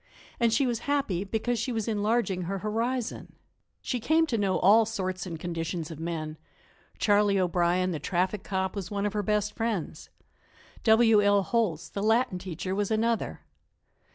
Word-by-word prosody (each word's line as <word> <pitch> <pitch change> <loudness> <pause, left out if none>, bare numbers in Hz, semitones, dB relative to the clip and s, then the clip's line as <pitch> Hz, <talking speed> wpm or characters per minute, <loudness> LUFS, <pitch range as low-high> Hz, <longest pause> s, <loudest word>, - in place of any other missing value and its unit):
And 235 -1 +3
she 245 +5 +2
was 240 -3 -1
happy 240 -11 0
because 225 +3 -1
she 255 - -2
was 225 -2 -2
enlarging 215 -2 0
her 195 +3 -2
horizon. 230 +4 -3 0.5
She 250 - -2
came 315 +7 +3
to 255 -8 -1
know 195 -2 +1
all 215 +4 +6
sorts 185 -4 -3
and 165 -3 -6
conditions 165 -1 -4
of 160 - -8
men; 160 -2 -4 0.6
Charley 205 -1 +3
O'Brien, 180 0 +1
the 160 - -3
traffic 185 +5 -1
cop, 190 0 -2
was 190 -3 -4
one 200 0 -2
of 205 - -1
her 210 - 0
best 210 +1 0
friends. 225 -7 -3 0.8
W. 220 -1 +6
L. 205 -1 +4
Holtz, 205 -8 0
the 200 - -5
Latin 220 -2 +2
teacher, 185 0 -4
was 205 0 -1
another. 225 +1 0
205 Hz, 165 wpm, -28 LUFS, 185-225 Hz, 0.8 s, all